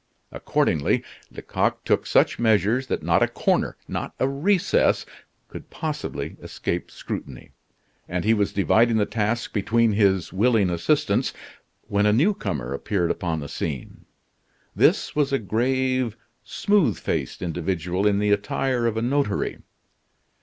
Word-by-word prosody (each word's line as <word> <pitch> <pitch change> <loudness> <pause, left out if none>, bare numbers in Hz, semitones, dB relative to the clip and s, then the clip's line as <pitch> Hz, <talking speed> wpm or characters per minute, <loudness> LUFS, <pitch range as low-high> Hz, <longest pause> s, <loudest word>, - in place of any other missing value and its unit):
Accordingly, 70 -2 0 0.3
Lecoq - - -2
took - - +1
such - - +3
measures 110 +3 +2
that - - -2
not - - +2
a - - +4
corner, - - 0
not - - -5
a 130 - +2
recess, 180 +8 +2 0.4
could - - -10
possibly 155 -2 -5
escape 85 - -4
scrutiny; 65 -3 -7 0.6
and 90 +1 -2
he 110 - +4
was 105 -2 +1
dividing 110 +5 +3
the 105 - +2
task 115 +2 -2
between 110 +2 +2
his 95 -5 +2
willing 105 -2 +3
assistants, 85 -1 +1 0.5
when 100 +1 +2
a 105 - +4
new 160 - +3
comer 70 - -4
appeared 85 +4 -1
upon 80 -4 -2
the 70 - -6
scene. 70 -3 -5 0.7
This - - +2
was 145 -2 +1
a 135 - +3
grave, 130 +2 0 0.3
smooth 205 -5 +1
faced - - -3
individual 90 +2 -1
in 100 -1 +2
the 105 0 +1
attire 120 +4 0
of 110 -1 -1
a 115 - -1
notary. 130 -4 0
105 Hz, 140 wpm, -24 LUFS, 95-125 Hz, 0.7 s, a